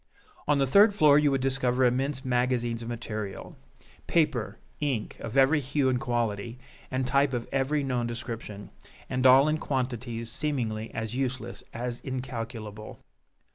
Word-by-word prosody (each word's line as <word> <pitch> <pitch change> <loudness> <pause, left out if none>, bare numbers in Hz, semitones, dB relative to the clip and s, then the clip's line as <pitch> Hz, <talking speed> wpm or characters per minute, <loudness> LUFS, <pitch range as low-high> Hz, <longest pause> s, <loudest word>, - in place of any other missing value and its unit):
On 150 -1 +3
the 135 - +3
third 200 - +6
floor 150 -5 +6
you 150 -1 +3
would 135 -1 0
discover 130 -1 +1
immense 130 +2 0
magazines 125 -2 0
of 115 - -6
material 110 -4 -5 0.5
paper, 130 -11 +1 0.2
ink, 135 -8 -2
of 115 - -5
every 135 +3 +5
hue 135 0 0
and 125 -1 0
quality, 115 -1 -2 0.3
and 130 0 -1
type 140 +1 +2
of 120 -1 -2
every 140 +2 +1
known 125 -3 -1
description; 115 -4 -6 0.4
and 130 +1 +3
all 135 +3 +7
in 155 0 +1
quantities 120 -4 -3
seemingly 120 -6 -2
as 110 0 -3
useless 130 -2 -3
as 120 +1 -4
incalculable. 115 -5 -6
125 Hz, 145 wpm, -28 LUFS, 115-135 Hz, 0.5 s, all